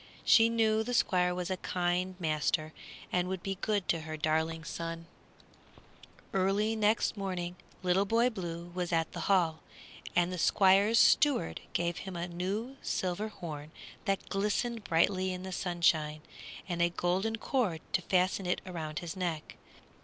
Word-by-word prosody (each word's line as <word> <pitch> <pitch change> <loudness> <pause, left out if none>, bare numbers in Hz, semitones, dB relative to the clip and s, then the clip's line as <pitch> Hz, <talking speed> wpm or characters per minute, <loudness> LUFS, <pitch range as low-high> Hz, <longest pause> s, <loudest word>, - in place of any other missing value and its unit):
She 225 0 +6
knew 220 -1 +2
the 245 +2 -2
Squire 180 -4 +2
was 180 +1 -3
a 185 - -1
kind 180 +1 -1
master 155 -1 0 0.4
and 180 0 +1
would 190 -1 -4
be 195 -1 -3
good 205 -3 0
to 165 - +2
her 155 0 -6
darling 160 +1 0
son. 165 0 -5 1.3
Early 195 +3 +2
the 220 - -4
next 210 +2 +2
morning 180 -3 -3 0.3
Little 185 +2 +3
Boy 230 +4 +3
Blue 175 -4 -6
was 180 -1 -2
at 165 -1 +1
the - - -4
Hall, 170 -5 +3 0.6
and 175 +1 +2
the 180 - -4
Squire's 200 +6 +4
steward 270 - +4
gave 170 -1 0
him 190 -2 -7
a 170 +1 -3
new 200 +9 -3
silver 185 +3 -2
horn, 155 -7 -7 0.4
that 195 -2 -1
glistened 210 +3 -1
brightly 185 +3 +2
in 180 0 -5
the 190 - -6
sunshine, 165 -4 +1 0.5
and 175 -2 -2
a 175 - +4
golden 185 +6 0
cord 220 - -1
to - - +2
fasten 185 +1 +1
it 180 - +1
around 160 -4 -5
his 170 +1 -4
neck. 175 -4 -3
180 Hz, 160 wpm, -31 LUFS, 170-200 Hz, 1.3 s, She